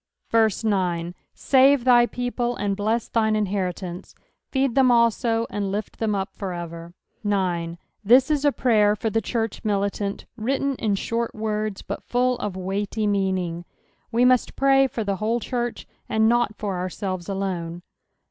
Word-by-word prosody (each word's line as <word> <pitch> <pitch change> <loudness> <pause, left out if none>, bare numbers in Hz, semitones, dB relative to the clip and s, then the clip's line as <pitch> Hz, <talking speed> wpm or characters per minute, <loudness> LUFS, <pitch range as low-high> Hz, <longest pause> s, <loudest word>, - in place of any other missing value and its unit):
9 180 -5 0 0.2
Save 270 -1 +4
thy 240 -1 +6
people, 245 0 -2
and 200 -3 -1
bless 215 +3 -1
thine 220 -2 +1
inheritance: 185 -3 -3 0.3
feed 265 -2 +1
them 265 -1 +4
also, 235 -1 +3
and 200 -1 -2
lift 210 +2 -4
them 215 -2 0
up 195 0 -3
for 190 -3 -5
ever. 170 0 -7 0.3
0. 180 -5 -1 0.3
This 255 +8 +5
is 295 -2 +1
a 290 - +4
prayer 210 -6 +3
tor 220 +1 -2
the 225 - +1
chnrch 225 -3 -3
militant, 200 -1 -1
written 270 +4 -1
in 210 -3 0
short 230 +3 -2
words, 215 -2 -3
but - - -5
full 250 0 0
of 200 -3 -4
weighty 200 +3 -2
meaning. 190 -4 0 0.5
We 240 +2 +3
must 255 -1 +3
pray 270 0 +4
for 230 -3 -4
the 200 -2 -1
whole 225 +4 0
church, 240 0 -3 0.2
and 220 0 +3
not 240 -2 +2
for 195 -4 -3
ourselves 185 0 -4
alone. 175 -3 -3
215 Hz, 155 wpm, -24 LUFS, 190-240 Hz, 0.5 s, thy